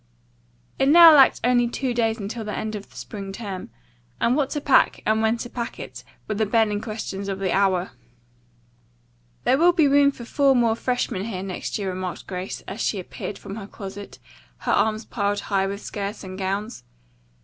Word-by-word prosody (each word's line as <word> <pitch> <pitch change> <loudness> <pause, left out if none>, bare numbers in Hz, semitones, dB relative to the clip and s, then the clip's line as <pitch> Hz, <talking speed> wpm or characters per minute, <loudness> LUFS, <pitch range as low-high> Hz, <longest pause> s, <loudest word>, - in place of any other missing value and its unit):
It 270 - +3
now 335 +1 +10
lacked 275 -3 +6
only 245 0 +3
two 250 +1 -2
days 225 -2 +1
until 220 +2 -5
the 210 -1 -4
end 215 0 -3
of 205 -1 -7
the - - -22
spring 195 -2 -7
term, 195 -3 -6 0.5
and 240 - +2
what 280 -2 +1
to 295 - -2
pack 280 -2 +3
and 220 +1 +2
when 220 +1 +2
to 240 - -5
pack 235 -1 -5
it - - -8 0.2
were 215 - -1
the 215 0 0
burning 210 -1 +2
questions 210 -3 -5
of 195 - -2
the 190 -2 -1
hour. 190 -2 +1 1.5
"There 265 - +3
will 350 +2 +5
be 320 -4 +4
room 280 0 +5
for 245 -4 -8
four 275 +2 +3
more 230 -2 +3
freshmen 235 -5 -2
here 190 -5 -4
next 190 -2 -4
year," 200 -2 -3
remarked 185 -1 -5
Grace, 185 0 -5
as 210 - -7
she 205 - 0
appeared 190 +2 -6
from 200 +1 -8
her 200 -3 -7
closet, 200 0 -9 0.5
her - - +1
arms 220 0 +1
piled 205 -2 -1
high 195 -1 0
with 200 +1 -5
skirts 205 +1 -5
and 185 -1 -7
gowns. 195 +4 -3
215 Hz, 195 wpm, -24 LUFS, 195-240 Hz, 1.5 s, now